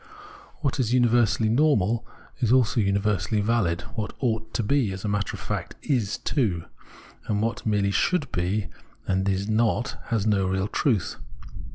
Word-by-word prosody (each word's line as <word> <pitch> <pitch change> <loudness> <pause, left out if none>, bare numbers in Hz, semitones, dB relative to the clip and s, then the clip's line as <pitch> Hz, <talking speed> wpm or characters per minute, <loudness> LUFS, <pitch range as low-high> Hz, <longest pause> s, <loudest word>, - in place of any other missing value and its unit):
What 140 -2 -1
is 125 -1 +2
universally 120 -2 +3
normal 115 -4 +2 0.4
is 120 -4 +1
also 125 -2 +3
univer 100 -1 +1
sally 110 - 0
valid: 100 -6 +1
what 105 -3 -4
ought 110 -3 -1
to 115 - +1
be, 125 -2 +1
as 95 +2 -6
a - - 0
matter 100 -1 -1
of - - -10
fact - - -4
is 120 -8 0
too; 100 - 0 0.6
and 105 -1 0
what 115 +1 -2
merely 100 -2 +2
should 155 - +1
be, 95 +3 -1 0.4
and 95 +1 0
is 95 +1 -1
not, 115 +2 +1
has 110 -4 -1
no 100 -3 +2
real 95 +1 0
truth. 110 - 0
110 Hz, 165 wpm, -25 LUFS, 100-120 Hz, 0.6 s, universally